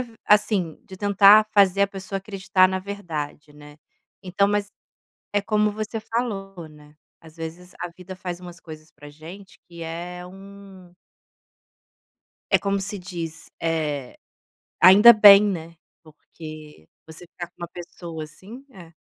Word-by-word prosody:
v - - -23
assim, 205 -5 +2
de 190 - -12
tentar 205 +2 +6
fazer 200 -1 +4
a - - +4
pessoa 195 0 -7
acreditar 190 -1 +1
na 190 0 -2
verdade, 160 -7 -7
né. 150 0 -15 0.4
Então 195 +2 0
mas 205 0 -1 0.6
é 205 - +1
como 210 0 +1
você 215 +1 -5
falou, 195 -7 -5
né, 150 0 -18 0.3
às 160 0 -17
vezes, 165 +3 -9
a 175 - -4
vida 185 0 -11
faz 180 -1 -6
umas 175 -1 -11
coisas 155 -1 -12
pra 145 0 -14
gente 170 +6 -13
que 170 -1 -11
é 175 +2 -7
um 195 -1 -14 1.6
é - - +7
como 200 0 -1
se 200 +1 -4
diz, 170 -4 -7
eh, 150 -5 -3 0.6
ainda 205 +6 +9
bem, 205 -2 +8
né, 170 -5 -4 0.3
porque 155 - -13 0.2
você 160 +2 -12
ficar 175 0 -8
com - - -51
uma 175 - -6
pessoa 170 -2 -9
assim 200 - -13
É. 170 -6 -14
180 Hz, 145 wpm, -23 LUFS, 160-200 Hz, 1.6 s, ainda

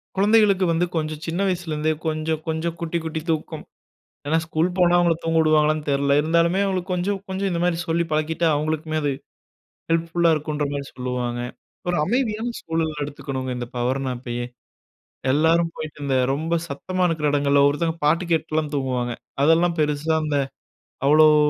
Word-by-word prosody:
கொழந்தைங்களுக்கு 200 -1 +4
வந்து 170 +2 +2
கொஞ்சம் 155 -1 -2
சின்ன 170 +4 -2
வயசுலேருந்தே 160 -4 -1
கொஞ்சம் 155 0 -1
கொஞ்சம் 160 +1 -2
குட்டி 170 0 -2
குட்டி 160 -1 -3
தூக்கம். 160 0 -2 0.6
ஏன்னா 160 +3 +2
ஸ்கூல் 160 +2 +1
போனா 175 -1 +4
அவங்கள 170 -1 +3
தூங்க 165 0 +2
விடுவாங்களான்னு 155 -1 +3
தெரியல. 140 0 +2
இருந்தாலுமே 170 +4 +2
அவங்களுக்கு 185 -1 -2
கொஞ்சம் 190 +3 -1
கொஞ்சம் 190 +1 -1
இந்த 170 -1 -1
மாரி 175 -1 +2
சொல்லி 170 +1 +1
பழக்கிட்டா, 160 +2 0
அவங்களுக்குமே 155 +1 -2
அது 145 - +1 0.8
ஹெல்ப்ஃபுல்லா 165 +1 +2
இருக்குன்ற 150 0 -2
மாரி 140 -1 -3
சொல்லுவாங்க. 125 -1 -3 0.5
ஒரு 175 - +1
அமைதியான 235 - 0
சூழல்ல 160 -2 -2
எடுத்துக்கணுங்க 135 -3 -5
இந்த 120 - -4
பவர்னாப்பயே. 125 -1 -2 0.9
எல்லாரும் 165 +3 +3
போயிட்டு 150 -2 -7
இந்த 135 -2 +1 0.2
ரொம்ப 160 +4 -1
சத்தமா 180 +6 -2
இருக்கிற 155 -2 -1
இடங்கள்ல 140 -1 +3
ஒவ்வொருத்தவங்க 160 +3 +1
பாட்டு 165 +4 +3
கேட்டுலாம் 155 -2 0
தூங்குவாங்க. 125 -3 -1 0.3
அதெல்லாம் 165 +3 +4
பெருசா 150 +1 0
அந்த 145 -2 0 0.7
அவ்வளவு 155 +1 +7
160 Hz, 145 wpm, -23 LUFS, 145-170 Hz, 0.9 s, அவ்வளவு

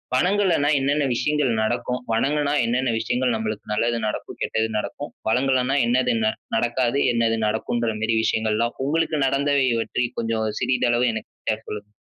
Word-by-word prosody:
வணங்கலனா 180 -1 +2
என்னென்ன 140 +2 +1
விஷயங்கள் 150 +1 +1
நடக்கும்? 120 +2 -1
வணங்குனா 145 +5 +1
என்னென்ன 125 +2 +1
விஷயங்கள் 125 +2 0
நம்மளுக்கு 110 -1 -4
நல்லது 115 +2 +1
நடக்கும்? 105 - -5
கெட்டது 110 0 0
நடக்கும்? 145 +7 -5 0.2
வணங்கலன்னா 130 +2 +2
என்னது 125 +2 +2
ந 110 - +3 0.2
நடக்காது? 120 +3 +1
என்னது 115 -1 +1
நடக்கும்ன்ற 115 +1 -1
மாரி 110 +1 +1
விஷயங்கள் 110 -1 +1
எல்லா, 115 +1 +1 0.2
உங்களுக்கு 160 +1 0
நடந்தவை 140 0 +2
பற்றி 125 +2 -1
கொஞ்சம் 115 -1 -1
சிறிதளவு 125 -1 +2
எனக்கிட்ட 110 0 -4
சொல்லுங்க. 105 0 -7
120 Hz, 140 wpm, -23 LUFS, 115-135 Hz, 0.2 s, ந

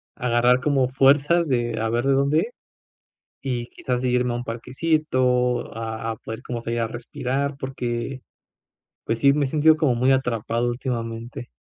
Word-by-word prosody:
agarrar 125 +1 +3
como 140 -4 +2
fuerzas 145 +6 +4
de 120 -4 0
a 110 - 0
ver 120 +3 0
de 140 - +3
dónde, 145 - +2 0.9
y 125 -3 -3
quizás 125 -1 -3
irme 125 -1 +1
a - - -2
un 120 - -4
parquecito 125 -1 0
a 115 0 -4
a - - -4
poder 110 0 -7
como 120 -2 -4
salir 115 0 -2
a 115 - 0
respirar, 135 +3 -3
porque, 130 -1 -4 0.8
pues 115 0 -1
sí, 140 +3 +5
me 145 0 +1
he - - -1
sentido 155 +3 +4
como 150 -5 +2
muy 130 +3 +3
atrapado 120 -2 0
últimamente. 120 -1 -4
125 Hz, 160 wpm, -23 LUFS, 120-135 Hz, 0.9 s, sí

